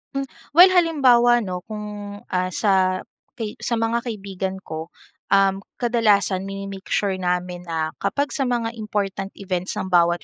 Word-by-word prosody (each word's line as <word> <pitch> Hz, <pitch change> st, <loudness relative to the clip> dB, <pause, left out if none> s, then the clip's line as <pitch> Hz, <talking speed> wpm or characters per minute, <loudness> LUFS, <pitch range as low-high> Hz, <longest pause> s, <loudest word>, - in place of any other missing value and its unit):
Mm, 275 Hz, -, 0 dB, 0.3 s
well 365 Hz, +2 st, +9 dB
halimbawa, 275 Hz, -9 st, +5 dB
'no, 180 Hz, -2 st, -4 dB
kung, 210 Hz, -1 st, -7 dB
ah, 185 Hz, 0 st, 0 dB
sa 185 Hz, -2 st, +2 dB, 0.3 s
kai 220 Hz, -3 st, -5 dB
sa 235 Hz, -, 0 dB
mga 225 Hz, +1 st, +1 dB
kaibigan 195 Hz, -3 st, -4 dB
ko, 160 Hz, +1 st, -6 dB, 0.4 s
uhm, 195 Hz, -1 st, +4 dB, 0.2 s
kadalasan 210 Hz, -6 st, +2 dB
mine-make 195 Hz, 0 st, -7 dB
sure 200 Hz, -2 st, +1 dB
namin 180 Hz, 0 st, -2 dB
na 160 Hz, -1 st, -1 dB
kapag 280 Hz, +9 st, -1 dB
sa 270 Hz, -2 st, 0 dB
mga 235 Hz, -2 st, 0 dB
important 200 Hz, -2 st, -2 dB
events 185 Hz, -2 st, -3 dB
ng 190 Hz, -, -4 dB
bawat 175 Hz, 0 st, +3 dB
200 Hz, 145 wpm, -22 LUFS, 185-230 Hz, 0.4 s, well